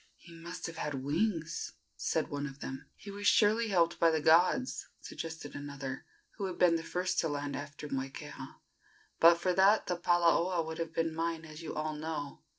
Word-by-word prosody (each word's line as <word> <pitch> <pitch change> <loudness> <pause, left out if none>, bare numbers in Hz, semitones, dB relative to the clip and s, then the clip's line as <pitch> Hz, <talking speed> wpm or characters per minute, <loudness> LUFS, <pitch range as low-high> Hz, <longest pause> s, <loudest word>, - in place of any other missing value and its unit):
"He 170 - -16
must 170 +2 -7
have 165 -1 -6
had 140 -3 -3
wings," 165 +2 -1 0.2
said - - 0
one 145 0 -3
of 135 0 -10
them. 135 -1 -7
"He 200 - -10
was 205 0 -2
surely 220 +2 +4
helped 175 -5 +2
by 165 - +6
the 160 -1 +1
gods," 175 - +3
suggested 160 -3 -7
another, 140 -2 -6 0.3
who 200 - -2
had 185 -2 -4
been 175 -2 +5
the 165 - -1
first 180 +3 -1
to 165 - +2
land 145 -1 -3
after 145 +1 -7
Moikeha. 135 -1 -6 0.6
"But 170 +1 +8
for 180 +1 0
that 195 +4 +5
the 180 - -1
palaoa 175 0 +2
would 160 0 -6
have 165 -1 -3
been 165 -1 0
mine, 165 0 -2
as 155 +1 -10
you 165 - -6
all 155 0 -2
know. 150 -2 -5
165 Hz, 190 wpm, -32 LUFS, 145-180 Hz, 0.6 s, But